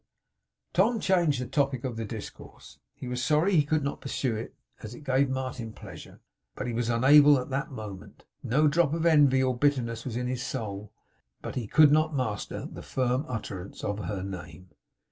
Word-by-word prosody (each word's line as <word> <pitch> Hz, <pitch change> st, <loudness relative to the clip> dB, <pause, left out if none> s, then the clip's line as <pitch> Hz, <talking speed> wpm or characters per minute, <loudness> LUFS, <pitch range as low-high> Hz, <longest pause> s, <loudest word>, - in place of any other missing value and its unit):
Tom 220 Hz, +6 st, +3 dB
changed 175 Hz, -9 st, +2 dB
the 125 Hz, -, -3 dB
topic 135 Hz, -2 st, 0 dB
of 115 Hz, -4 st, -4 dB
discourse. -, -, -10 dB, 0.2 s
He -, -, -8 dB
was 125 Hz, 0 st, -3 dB
sorry 155 Hz, +8 st, +2 dB
he 150 Hz, -, +5 dB
could 150 Hz, 0 st, 0 dB
not 140 Hz, -, -3 dB
pursue 135 Hz, -3 st, -2 dB
it, 110 Hz, -, -6 dB, 0.3 s
as 110 Hz, +2 st, -8 dB
it 150 Hz, -, -12 dB
gave 135 Hz, 0 st, +2 dB
Martin 130 Hz, -4 st, -4 dB
pleasure; -, -, -12 dB, 0.3 s
but -, -, -4 dB
he 120 Hz, -, -3 dB
was 120 Hz, 0 st, -1 dB
unable, 140 Hz, +5 st, +6 dB
at 125 Hz, +1 st, -5 dB
that 135 Hz, +4 st, -2 dB
moment. 105 Hz, -8 st, -9 dB, 0.2 s
No 150 Hz, +6 st, +2 dB
drop 160 Hz, 0 st, +2 dB
of 165 Hz, 0 st, -2 dB
envy 145 Hz, -5 st, +5 dB
or 130 Hz, -1 st, +1 dB
bitterness 120 Hz, -4 st, 0 dB
was 125 Hz, -4 st, -5 dB
in 125 Hz, -, -2 dB
his 125 Hz, 0 st, -2 dB
soul; 105 Hz, -6 st, -5 dB, 0.5 s
but -, -, -5 dB
he 120 Hz, -4 st, -4 dB
could 150 Hz, +5 st, +6 dB
not 155 Hz, 0 st, +2 dB
master 110 Hz, -7 st, -3 dB
the -, -, -9 dB
firm 130 Hz, +2 st, -1 dB
utterance 100 Hz, -5 st, -6 dB
of 105 Hz, 0 st, -2 dB
her 100 Hz, -3 st, -4 dB
name. 90 Hz, -1 st, -8 dB
130 Hz, 185 wpm, -28 LUFS, 115-145 Hz, 0.5 s, unable